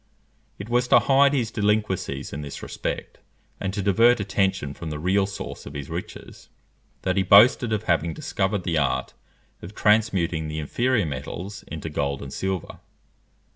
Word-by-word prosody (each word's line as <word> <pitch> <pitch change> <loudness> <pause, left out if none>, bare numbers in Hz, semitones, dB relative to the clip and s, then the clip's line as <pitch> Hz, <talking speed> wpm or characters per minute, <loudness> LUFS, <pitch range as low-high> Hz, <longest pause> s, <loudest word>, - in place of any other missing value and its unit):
It 100 - -7
was 120 +1 +1
to - - +6
hide 140 +1 +4
his 120 -5 0
delinquencies 105 - -1
in 70 - -4
this 70 -1 -8
respect, - - -5 0.4
and 95 - -2
to 100 0 -3
divert 115 +5 +4
attention 95 -7 0
from 80 +2 -7
the 75 - -4
real 95 +5 +1
source 100 - -7
of 70 - -9
his 70 -1 -6
riches, - - -8 0.5
that 95 0 0
he - - +4
boasted 110 +5 +6
of 110 -1 -1
having 85 -4 +1
discovered 95 0 -1
the 85 -3 0
art 70 -3 -1 0.5
of 95 +5 -10
transmuting 95 -7 +2
the 75 0 -5
inferior 120 - 0
metals 90 +8 -6
into 80 0 -6
gold 70 -3 -2
and 70 - -8
silver. 95 -3 -4
95 Hz, 165 wpm, -24 LUFS, 80-105 Hz, 0.5 s, to